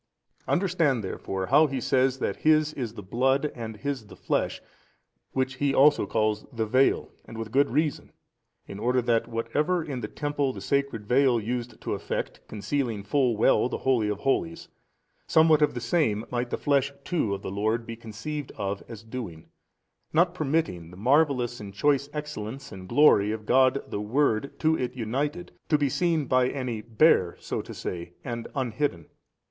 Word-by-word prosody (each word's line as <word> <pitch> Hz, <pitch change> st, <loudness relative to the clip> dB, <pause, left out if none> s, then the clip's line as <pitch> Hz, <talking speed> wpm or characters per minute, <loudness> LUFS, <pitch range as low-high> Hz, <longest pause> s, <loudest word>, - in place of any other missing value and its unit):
Understand 170 Hz, -, +1 dB
therefore 95 Hz, 0 st, -4 dB
how 150 Hz, +8 st, +5 dB
he 135 Hz, -2 st, -3 dB
says 130 Hz, +1 st, +2 dB
that -, -, -2 dB
His 155 Hz, -1 st, +3 dB
is 120 Hz, -6 st, -5 dB
the 105 Hz, -, -8 dB
Blood 135 Hz, +8 st, +1 dB
and 110 Hz, -2 st, -7 dB
His 135 Hz, -3 st, -4 dB
the -, -, -12 dB
flesh, -, -, -1 dB, 0.7 s
which 130 Hz, 0 st, -1 dB
he 140 Hz, 0 st, +1 dB
also 145 Hz, -6 st, +5 dB
calls 110 Hz, -1 st, 0 dB
the 115 Hz, -3 st, -1 dB
veil 130 Hz, +5 st, +2 dB, 0.2 s
and 115 Hz, -, -10 dB
with 115 Hz, -1 st, -5 dB
good 140 Hz, +3 st, +3 dB
reason, 150 Hz, +3 st, -1 dB, 0.5 s
in 100 Hz, -, -8 dB
order 125 Hz, +3 st, +2 dB
that 115 Hz, -1 st, +1 dB
whatever 150 Hz, +9 st, 0 dB
in 135 Hz, -5 st, -5 dB
the 105 Hz, -, -3 dB
temple 145 Hz, +1 st, -2 dB
the -, -, -7 dB
sacred 140 Hz, -6 st, -1 dB
veil 125 Hz, +1 st, +3 dB
used 120 Hz, +1 st, -4 dB
to -, -, -3 dB
effect, -, -, -4 dB
concealing 115 Hz, -1 st, -2 dB
full 125 Hz, -1 st, +1 dB
well 110 Hz, +2 st, +3 dB
the -, -, -3 dB
holy 120 Hz, -5 st, +1 dB
of 105 Hz, 0 st, -3 dB
holies, 85 Hz, -11 st, -1 dB, 0.6 s
somewhat 160 Hz, -1 st, +5 dB
of 150 Hz, -, +2 dB
the -, -, -2 dB
same 115 Hz, -4 st, +1 dB
might 120 Hz, 0 st, -1 dB
the -, -, -2 dB
flesh 140 Hz, -1 st, +1 dB
too 140 Hz, -, 0 dB
of 100 Hz, -, -10 dB
the -, -, -4 dB
Lord 110 Hz, +4 st, 0 dB
be 115 Hz, -, -6 dB
conceived 125 Hz, +6 st, -6 dB
of 100 Hz, 0 st, -3 dB
as 115 Hz, -2 st, -9 dB
doing, 110 Hz, -9 st, -7 dB, 0.6 s
not 175 Hz, +2 st, +3 dB
permitting 140 Hz, -, -1 dB
the 90 Hz, -, -13 dB
marvellous 125 Hz, 0 st, +2 dB
and 100 Hz, -2 st, -9 dB
choice 140 Hz, +3 st, +2 dB
Excellence 140 Hz, -4 st, -6 dB
and 95 Hz, -2 st, -10 dB
glory 105 Hz, -9 st, +5 dB
of 110 Hz, -1 st, -5 dB
God 130 Hz, +3 st, +4 dB
the 100 Hz, -, -4 dB
Word 120 Hz, +2 st, 0 dB
to 160 Hz, 0 st, +3 dB
it 125 Hz, -5 st, -3 dB
united, 140 Hz, +9 st, -3 dB, 0.2 s
to 150 Hz, -, +4 dB
be 145 Hz, -1 st, +1 dB
seen 165 Hz, 0 st, +1 dB
by 130 Hz, 0 st, +3 dB
any 125 Hz, -5 st, -3 dB
bare 110 Hz, -, +3 dB
so -, -, -3 dB
to -, -, -10 dB
say 85 Hz, -1 st, -5 dB
and 120 Hz, -2 st, -5 dB
unhidden. 120 Hz, -, -1 dB
125 Hz, 175 wpm, -27 LUFS, 110-145 Hz, 0.7 s, how